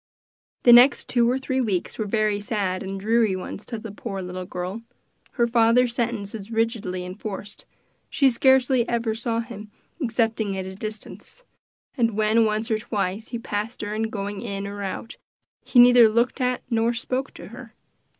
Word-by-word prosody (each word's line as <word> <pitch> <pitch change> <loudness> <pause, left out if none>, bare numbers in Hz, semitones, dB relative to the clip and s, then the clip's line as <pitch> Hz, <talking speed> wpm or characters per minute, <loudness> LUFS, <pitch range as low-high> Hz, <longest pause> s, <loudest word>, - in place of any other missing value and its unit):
The 240 - +8
next 245 +3 +6
two 240 -1 +3
or 255 - +1
three 265 0 -1
weeks 200 -5 -2
were 215 - -1
very 215 -1 +1
sad 200 -3 -2
and 195 0 -5
dreary 220 -1 +2
ones 185 +2 -7
to 235 - -5
the 215 -1 -8
poor 200 -1 -6
little 180 0 -6
girl. 180 +5 -5 0.5
Her 235 - +2
father's 235 +1 +3
sentence 235 -4 -2
was 210 -2 -8
rigidly 225 -5 -1
enforced; 200 +2 -7 0.4
she 275 - +3
scarcely 260 0 +3
ever 230 -2 0
saw 230 +1 -1
him 215 -3 -9 0.3
excepting 225 -5 0
at 190 - -4
a 190 - -7
distance, 215 - -8 0.5
and 230 -5 +1
when 220 +1 +3
once 215 +2 -1
or 215 - +1
twice 205 -1 -3
he 235 - -4
passed 215 0 -4
her 205 0 -4
in 220 +1 -1
going 200 -1 -5
in 200 -3 -4
and 200 0 -6
out, 200 +3 -5 0.5
he - - -1
neither 245 -2 +8
looked 235 +4 0
at 250 0 0
nor 230 -1 +1
spoke 255 +3 -3
to - - -10
her. 235 -1 -12
225 Hz, 175 wpm, -24 LUFS, 205-235 Hz, 0.5 s, The